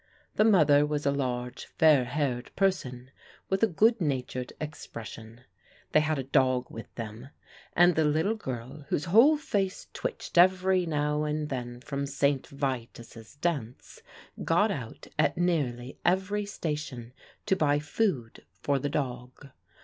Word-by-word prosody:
The -, -, +3 dB
mother 155 Hz, -9 st, +5 dB
was 150 Hz, 0 st, -2 dB
a 140 Hz, -, +3 dB
large 125 Hz, -3 st, -3 dB
fair 150 Hz, -5 st, +4 dB
haired 125 Hz, -2 st, -2 dB
person, 130 Hz, -10 st, -1 dB, 0.4 s
with 190 Hz, -, +1 dB
a 225 Hz, -, +5 dB
good 220 Hz, +4 st, +3 dB
natured 130 Hz, -4 st, -2 dB
expression. 115 Hz, -6 st, -8 dB, 0.5 s
They -, -, +5 dB
had 155 Hz, 0 st, 0 dB
a 135 Hz, -, -2 dB
dog 130 Hz, -1 st, +1 dB
with 115 Hz, -, -9 dB
them, 115 Hz, +3 st, -7 dB, 0.4 s
and 175 Hz, +1 st, +5 dB
the 160 Hz, -, +2 dB
little 155 Hz, +8 st, +2 dB
girl, 130 Hz, -, -6 dB
whose 155 Hz, -, 0 dB
whole 235 Hz, -, +6 dB
face 195 Hz, -10 st, -2 dB
twitched -, -, -2 dB
every 185 Hz, 0 st, +4 dB
now 150 Hz, -1 st, 0 dB
and 150 Hz, 0 st, -2 dB
then 120 Hz, -2 st, -5 dB
from 140 Hz, +1 st, -3 dB
St. 140 Hz, -1 st, 0 dB
Vitus' 120 Hz, -4 st, -5 dB
dance, 145 Hz, -7 st, -4 dB, 0.4 s
got -, -, +3 dB
out -, -, -6 dB
at -, -, +2 dB
nearly 140 Hz, -8 st, -1 dB
every 190 Hz, +3 st, +1 dB
station 150 Hz, -, -5 dB, 0.3 s
to 190 Hz, -, +2 dB
buy 145 Hz, -5 st, +2 dB
food 150 Hz, -, -2 dB, 0.2 s
for 140 Hz, -1 st, 0 dB
the 145 Hz, -, -2 dB
dog. 130 Hz, -2 st, -4 dB
145 Hz, 140 wpm, -28 LUFS, 125-175 Hz, 0.5 s, whole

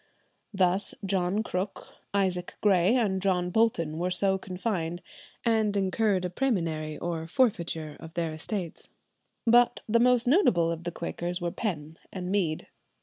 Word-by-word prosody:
Thus 190 Hz, -1 st, +1 dB
John 190 Hz, +2 st, 0 dB
Crook, 195 Hz, -1 st, -4 dB, 0.3 s
Isaac 185 Hz, -3 st, -1 dB
Grey, 195 Hz, +1 st, +4 dB
and 200 Hz, -6 st, +1 dB
John 180 Hz, -2 st, +1 dB
Bolton 170 Hz, -8 st, +1 dB
were 180 Hz, +1 st, 0 dB
so 190 Hz, +1 st, +2 dB
confined, 180 Hz, -3 st, -3 dB, 0.4 s
and 220 Hz, -3 st, +2 dB
incurred 195 Hz, -1 st, +1 dB
a -, -, -1 dB
præmunire 165 Hz, -, -1 dB
or 165 Hz, -2 st, -3 dB
forfeiture 170 Hz, -, 0 dB
of 165 Hz, 0 st, -11 dB
their 165 Hz, -2 st, -1 dB
estates. 170 Hz, +2 st, -5 dB, 0.6 s
But 240 Hz, +1 st, +4 dB
the 230 Hz, +2 st, +3 dB
most 250 Hz, 0 st, +4 dB
notable 220 Hz, -, +4 dB
of 170 Hz, 0 st, -5 dB
the 175 Hz, -, -2 dB
Quakers 175 Hz, +1 st, -3 dB
were 175 Hz, -1 st, -2 dB
Penn 160 Hz, -8 st, -4 dB
and 180 Hz, -1 st, -4 dB
Mead. 175 Hz, -6 st, 0 dB
185 Hz, 145 wpm, -28 LUFS, 170-210 Hz, 0.6 s, Grey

